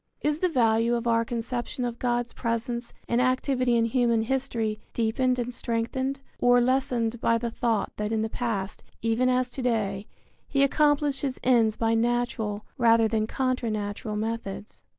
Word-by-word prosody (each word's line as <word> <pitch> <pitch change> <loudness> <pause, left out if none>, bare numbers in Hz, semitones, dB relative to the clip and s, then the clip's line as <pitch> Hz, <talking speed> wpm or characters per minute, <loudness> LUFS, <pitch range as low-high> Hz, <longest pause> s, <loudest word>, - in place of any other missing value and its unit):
Is 300 +1 0
the 365 - +2
value 230 -4 +3
of 235 0 -3
our 230 -1 +3
conception 240 +1 -3
of 240 -1 -4
God's 240 -1 -1
presence 235 +1 -2 0.2
and 235 +1 +2
activity 255 -1 +1
in 230 -1 +3
human 235 -1 +2
history 230 -4 -1 0.2
deepened 250 +3 +1
and 245 0 -3
strengthened 260 +4 -2 0.2
or 245 0 +5
lessened 240 -2 +1
by 230 - +3
the 235 0 -3
thought 230 -3 0
that 210 +1 -2
in 220 -1 +1
the - - 0
past, 215 -4 -3 0.2
even 230 +3 +2
as 255 0 +1
to 265 - -5
day, 215 -4 -1 0.4
he 275 -1 +2
accomplished 290 -1 +2
his 270 -3 -2
ends 230 -4 +4
by 225 0 +1
natural 225 -2 0
rather 230 -1 +5
than 215 0 0
contra 255 -1 -1
natural 210 0 -3
methods? 215 -1 -4
235 Hz, 165 wpm, -26 LUFS, 225-255 Hz, 0.4 s, or